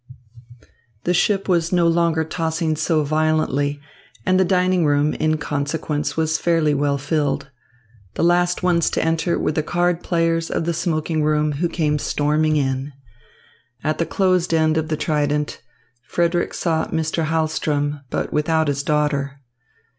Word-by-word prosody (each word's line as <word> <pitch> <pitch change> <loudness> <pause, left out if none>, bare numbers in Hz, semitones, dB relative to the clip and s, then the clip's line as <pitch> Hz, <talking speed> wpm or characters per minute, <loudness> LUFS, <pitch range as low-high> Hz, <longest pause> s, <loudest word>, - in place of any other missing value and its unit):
The 180 - +1
ship 195 +2 +1
was 170 -3 +1
no 175 -2 +3
longer 165 -1 +2
tossing 160 0 -1
so 155 0 +1
violently, 150 -2 0 0.5
and 185 0 +3
the - - +5
dining 185 -1 +2
room, 145 0 +2
in 155 0 0
consequence, 150 +1 -3
was 160 0 +1
fairly 165 -3 +2
well 140 0 +1
filled. 140 -1 -1 0.6
The - - -1
last 175 +1 +2
ones 175 -2 +2
to - - -1
enter 165 +1 0
were - - 0
the 155 - 0
card 175 +2 0
players 165 -1 0
of - - -2
the 170 - 0
smoking 160 -1 -1
room, 150 0 +1
who 160 +4 -1
came 150 -3 0
storming 150 +2 +1
in. 135 0 -1 0.9
At 155 - -1
the 170 - 0
closed 185 -2 +1
end 160 -1 +2
of 160 0 0
the 155 -1 -2
trident, 150 -1 -1 0.4
Frederick 170 +6 -1
saw 160 -2 0
Mr. 160 0 -1
Hahlström, 155 -2 -1
but - - -3
without 160 0 +1
his 140 0 -1
daughter. 140 -2 -1
155 Hz, 150 wpm, -21 LUFS, 150-170 Hz, 0.9 s, the